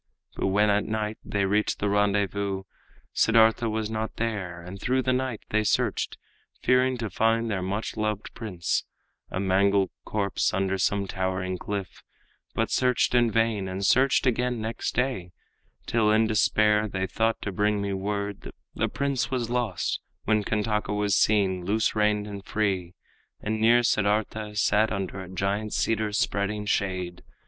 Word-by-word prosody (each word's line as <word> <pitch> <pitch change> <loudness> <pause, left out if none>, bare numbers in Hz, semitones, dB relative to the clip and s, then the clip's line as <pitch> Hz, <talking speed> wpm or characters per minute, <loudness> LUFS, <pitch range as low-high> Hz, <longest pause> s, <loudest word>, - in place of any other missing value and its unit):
But - - -1
when 105 +2 +3
at 105 0 +1
night 110 0 -3
they 100 -1 0
reached 105 +2 +1
the 100 - -1
rendezvous, 100 -1 0 0.5
Siddartha 115 +1 +4
was 110 0 -1
not 110 0 -3
there; 100 -7 -3
and 90 +3 -9
through 130 +1 +1
the 130 - +2
night 130 -3 -2
They 110 +1 +2
searched, 105 - 0 0.5
fearing 125 0 +3
to 115 -3 -4
find 115 0 +1
their 95 -3 -1
much 100 +4 -3
loved 105 -1 -2
prince 95 -7 -2 0.5
A - - -3
mangled 100 0 +2
corpse 100 -3 0
under 95 0 0
some 100 +2 +1
towering 95 -1 -2
cliff, 100 -2 -5 0.5
But - - 0
searched 125 -1 +2
in 120 -1 +4
vain, 115 -3 +1
and 95 +1 -3
searched 130 +5 +4
again 125 -1 +1
next 110 +1 -3
day, 125 -9 -1 0.5
Till 110 -2 +2
in 110 +1 +4
despair 105 0 +3
they 95 -1 -2
thought 110 +4 0
to 100 - -3
bring 105 +2 +1
me 100 -1 -2
word 100 +1 -3 0.2
The - - -1
prince 135 -5 -1
was 120 -3 -2
lost, 120 -7 -1 0.3
when 110 -1 +2
Kantaka 105 -1 -1
was 105 -1 +1
seen 95 -4 +2
Loose 105 +4 +1
reined 105 -1 +2
and 100 -2 -7
free, 95 -5 -1 0.4
and 110 +1 -2
near 120 +2 +5
Siddartha 105 -1 0
sat 110 +1 +3
Under 95 -1 -3
a 90 - -9
giant 100 +3 -2
cedar's 110 -1 0
spreading 105 +1 -1
shade. 90 -4 -1
105 Hz, 155 wpm, -26 LUFS, 100-110 Hz, 0.5 s, near